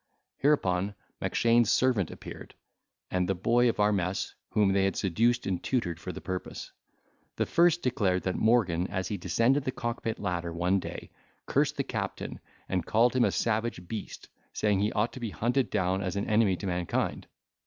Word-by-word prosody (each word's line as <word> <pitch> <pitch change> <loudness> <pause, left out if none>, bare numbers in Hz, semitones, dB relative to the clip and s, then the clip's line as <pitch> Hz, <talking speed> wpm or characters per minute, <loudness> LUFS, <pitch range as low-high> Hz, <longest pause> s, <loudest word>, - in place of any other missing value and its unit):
Hereupon 100 -9 +1 0.3
Mackshane's 115 -1 +3
servant 120 -10 +2
appeared, - - -10 0.6
and 90 0 0
the 95 - +2
boy 120 +6 +3
of 115 - -3
our 105 0 +4
mess, 95 -1 -1 0.2
whom 105 -3 +3
they 95 0 +3
had 95 - 0
seduced 115 +6 +1
and 95 -2 -1
tutored 90 -11 -1
for 85 +3 -5
the - - -7
purpose. 95 -1 -5 0.6
The - - 0
first 170 0 +3
declared, 100 -8 +1
that 95 - 0
Morgan 95 -7 +2
as 95 0 -3
he 105 - -2
descended 115 +10 +2
the 130 - -1
cockpit 115 -2 -3
ladder 90 -3 -2
one 90 +3 +1
day, - - -7 0.3
cursed - - +1
the - - +1
captain, - - -4 0.3
and 90 -2 -1
called 120 +6 +3
him 125 - +4
a - - +2
savage 110 -5 -1
beast, 110 +2 -6 0.3
saying, 105 -2 +1
he 105 +2 +1
ought 110 +2 0
to - - -7
be 115 -3 -3
hunted 120 +2 0
down 95 +1 0
as 95 0 -3
an 100 - -1
enemy 105 -3 +3
to 100 - -7
mankind. 90 -2 -2
100 Hz, 180 wpm, -29 LUFS, 90-120 Hz, 0.6 s, our